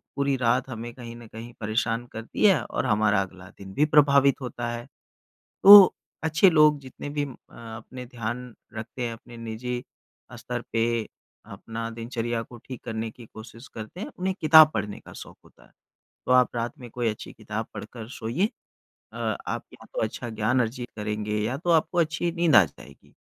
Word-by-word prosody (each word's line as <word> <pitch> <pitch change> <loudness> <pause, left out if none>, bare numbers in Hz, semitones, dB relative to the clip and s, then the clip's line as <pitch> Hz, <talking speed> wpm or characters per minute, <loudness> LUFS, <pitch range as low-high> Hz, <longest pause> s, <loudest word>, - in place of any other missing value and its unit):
पूरी 140 -1 +1
रात 125 +1 +1
हमें 120 -1 -6
कहीं 120 -2 -9
न 120 -1 -12
कहीं 115 +2 -10
परेशान 115 +2 -1
करती 115 - -2
है 190 - +5
और - - -3
हमारा 105 -1 +3
अगला 95 -1 -8
दिन 95 -1 -10
भी 150 - +3
प्रभावित 140 -2 +4
होता 120 -1 -4
है। 120 0 -6 0.8
तो 200 -1 +11 0.3
अच्छे 160 +4 +4
लोग 150 -2 +5
जितने 130 +1 -9
भी 145 - +2
अ - - -6 0.5
अपने 125 +3 -9
ध्यान 120 0 -5 0.2
रखते 110 +3 -6
हैं 120 -1 -2
अपने 115 +1 -12
निजी 115 +2 -4 0.5
अ, 125 - -10
स्तर 120 +1 -4
पे 115 -1 +1 0.4
अपना 115 0 -6
दिनचर्या 115 0 -3
को 120 +1 -13
ठीक 130 -3 -8
करने 110 -1 -3
की 115 +1 -14
कोशिश 115 +3 -11
करते 110 - -8
हैं 220 - -4
उन्हें 190 +1 -1
किताब 155 0 +8
पढ़ने 105 -1 -3
का - - -14
शौक - - -11
होता - - -21
है। - - -24 0.5
तो - - -1
आप 125 -1 +4
रात 120 0 -2
में 120 -2 -10
कोई 120 +1 -2
अच्छी 105 - -7
किताब - - -5
पढ़कर 115 -3 -8
सोइए। 130 - -1 0.6
अ - - -2
आप - - -3
या - - -14
तो - - -2
अच्छा 120 - -3
ज्ञान 110 +3 +1
अर्जित 120 +1 -4
करेंगे, 105 0 -2
या 115 +5 -1
तो 175 +4 -4
आपको 165 +2 +2
अच्छी 165 +1 0
नींद 170 -4 +3
आ 105 - +9
जाएगी। 70 -1 -16
120 Hz, 185 wpm, -26 LUFS, 110-140 Hz, 0.8 s, तो